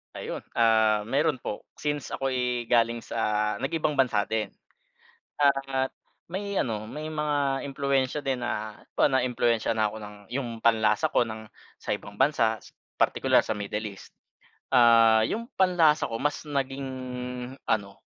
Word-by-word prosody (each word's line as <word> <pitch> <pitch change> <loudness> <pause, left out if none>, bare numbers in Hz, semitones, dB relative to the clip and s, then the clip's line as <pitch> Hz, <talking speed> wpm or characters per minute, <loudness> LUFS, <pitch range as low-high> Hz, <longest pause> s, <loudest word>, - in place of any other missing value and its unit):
Ayun, - - -5 0.2
ah, 110 -2 +4
meron 140 +2 +1
po. 105 - -5 0.2
Since 145 -2 -2
ako'y 125 -3 -1
galing 115 0 +3
sa 105 -2 -1
nag-ibang 150 +1 0
bansa 125 -7 +2
din. 110 -1 -2 0.8
Ah, 135 -2 +1 0.4
may 200 +3 -4
ano 110 - -1
may 155 +7 -6
mga 145 -3 0
impluwensiya 140 0 0
din 135 -2 -1
na 110 -3 -4 0.2
po - - +3
naiimpluwensiya 120 -3 +1
na 110 -1 +1
ako 110 - -9
ng 105 -1 -9
'yong 120 -3 -4
panlasa 110 -2 +3
ko 120 - +2
ng 110 -1 -8 0.3
sa - - -7
ibang - - -4
bansa, 115 -3 +2 0.3
partikular - - +3
sa 105 - -3
Middle 105 +1 -3
East. - - -15 0.6
Ah, 115 -3 +6
'yong 230 +2 -4
panlasa 170 -5 +4
ko 115 - -5
mas 145 0 0
naging 135 -1 -2 0.8
ano, 100 -2 -1
125 Hz, 140 wpm, -27 LUFS, 110-140 Hz, 0.8 s, Ah